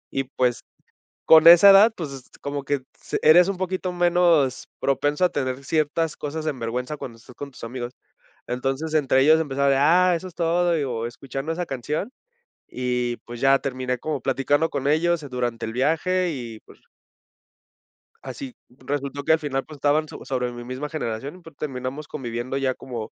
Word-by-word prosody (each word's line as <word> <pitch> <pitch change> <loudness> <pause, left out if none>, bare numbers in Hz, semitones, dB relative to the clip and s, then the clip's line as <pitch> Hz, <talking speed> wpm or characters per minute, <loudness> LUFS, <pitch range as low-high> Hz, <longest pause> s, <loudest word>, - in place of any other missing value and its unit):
y 135 - -2
pues 125 -2 0 0.6
con 160 0 +7
esa 175 +4 +10
edad, 205 +3 +7
pues 160 -7 -5
s 135 -2 -9 0.2
como 140 0 -4
que 140 0 -1 0.2
s - - -3
eres 170 +4 +7
un 195 -1 -2
poquito 185 0 -2
menos 175 -6 +2
propenso 145 +4 0
a - - +2
tener 130 -2 -3
ciertas 155 +2 0
cosas 155 +2 -5
en 145 -4 -2
vergüenza 125 +5 -3
cuando 120 -5 -8
estás 120 +2 -16
con 145 -1 -8
tus - - -14
amigos, 120 +1 -6 0.5
entonces 135 +5 -3
entre 135 -3 +3
ellos 155 +3 +5
empezaba 140 -2 +1
de: 135 - +3
"Ah 175 +5 +4
eso 170 +2 -4
es 180 - -16
todo", 175 +1 +1
digo 125 -7 -2
escuchando 135 +5 -5
esa 175 +2 -3
canción 150 - -3 0.6
y, 125 -1 -1
pues, 120 0 -9
ya 135 +1 +5
terminé 130 -2 -3
como 150 +1 -3
platicando 145 +5 +1
con 140 -1 -3
ellos 160 +1 +1
durante 120 -3 -3
el 110 - -5
viaje 170 +8 +1
y 120 -7 -7
pues - - -19 1.4
así, 270 - -8
resultó 140 +2 -5
que - - +3
al 160 - +4
final, 135 -3 -3
pues, 155 - -12
estaban 145 +3 +2
so - - -10
sobre 125 -2 -2
mi 120 0 -8
misma 130 +4 -5
generación 140 -1 -4
y - - -14
pues 165 -3 -15
terminamos 135 +1 -5
conviviendo 120 -1 -4
ya 135 -1 0
como 120 -5 -7
140 Hz, 180 wpm, -23 LUFS, 130-160 Hz, 1.4 s, esa